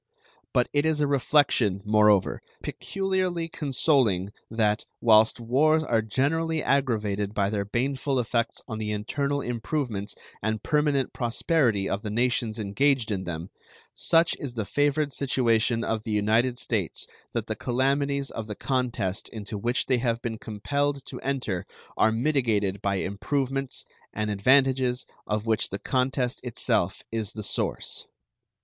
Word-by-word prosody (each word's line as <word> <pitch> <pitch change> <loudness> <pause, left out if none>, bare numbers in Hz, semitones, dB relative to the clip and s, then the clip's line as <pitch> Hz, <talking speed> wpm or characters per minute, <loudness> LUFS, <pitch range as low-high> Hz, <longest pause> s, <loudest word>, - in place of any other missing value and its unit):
But 125 0 +2
it 145 0 +3
is 160 -1 +1
a 150 - +3
reflection, 130 -8 +2
moreover, 105 -2 +4 0.2
peculiarly 185 -3 -1
consoling, 130 - +1 0.2
that, 110 -1 +1 0.2
whilst 110 0 +5
wars 150 +7 +3
are 115 -7 +2
generally 155 +8 0
aggravated 105 -7 0
by 100 0 +1
their 100 -2 -1
baneful 135 +5 -1
effects 115 -1 -1
on 110 - -5
the 105 -1 -3
internal 140 +7 -1
improvements 115 -4 -2 0.3
and 110 +1 -2
permanent 150 -3 +1
prosperity 120 - +1
of 100 - -2
the 110 - -4
nations 120 0 0
engaged 115 +3 +1
in 95 -2 -2
them, 85 +1 -5 0.4
such 165 0 +3
is 130 -4 -6
the 110 -3 -2
favored 145 +3 +1
situation 115 -3 +2
of 110 -1 -1
the 110 - -7
United 110 +4 +2
States 110 -8 -2 0.3
that - - -1
the - - -3
calamities 140 +2 0
of 110 -1 -5
the 105 - -5
contest 120 -8 -1
into 105 -1 -7
which 120 +5 0
they 130 -2 +2
have 115 -1 0
been 115 -2 -4
compelled 140 +6 -2
to - - -7
enter 125 -9 -2 0.3
are 110 - +4
mitigated 110 -6 +1
by 100 -1 0
improvements 135 +8 -2 0.3
and 105 0 -1
advantages 130 +3 +3 0.2
of 105 0 -1
which 110 -2 +1
the 100 - -3
contest 130 +2 0
itself 125 -3 0
is 110 -3 -2
the 105 - -5
source. - - -2
120 Hz, 140 wpm, -26 LUFS, 105-140 Hz, 0.4 s, whilst